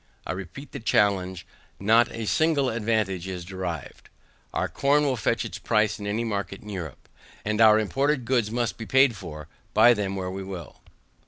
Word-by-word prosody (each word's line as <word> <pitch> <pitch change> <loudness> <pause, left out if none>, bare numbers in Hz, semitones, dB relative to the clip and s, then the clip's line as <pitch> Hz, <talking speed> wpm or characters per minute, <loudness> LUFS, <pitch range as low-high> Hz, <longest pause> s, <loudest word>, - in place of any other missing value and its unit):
I - - -3
repeat 95 - -7
the 140 - -6
challenge, 95 -5 +1 0.3
not 115 +4 +4
a 115 -1 -5
single 145 +1 +2
advantage 105 -5 -1
is 90 -2 -5
derived. 90 -5 -6 0.4
Our - - -1
corn 145 +2 +2
will 135 -3 +1
fetch 110 - 0
its - - -6
price 105 +1 +1
in 100 - -5
any 110 +3 -1
market 100 -3 -3
in 105 - -10
Europe, 85 -8 -7 0.4
and 105 +1 0
our 110 -1 +8
imported 135 +5 0
goods 120 -3 +1
must 120 +1 -2
be 115 - -6
paid 130 -2 +4
for 75 -5 -8 0.3
buy 115 +3 +7
them 100 -3 -2
where 95 -1 -3
we 95 +1 -5
will. 90 -7 -8
105 Hz, 180 wpm, -26 LUFS, 95-120 Hz, 0.4 s, our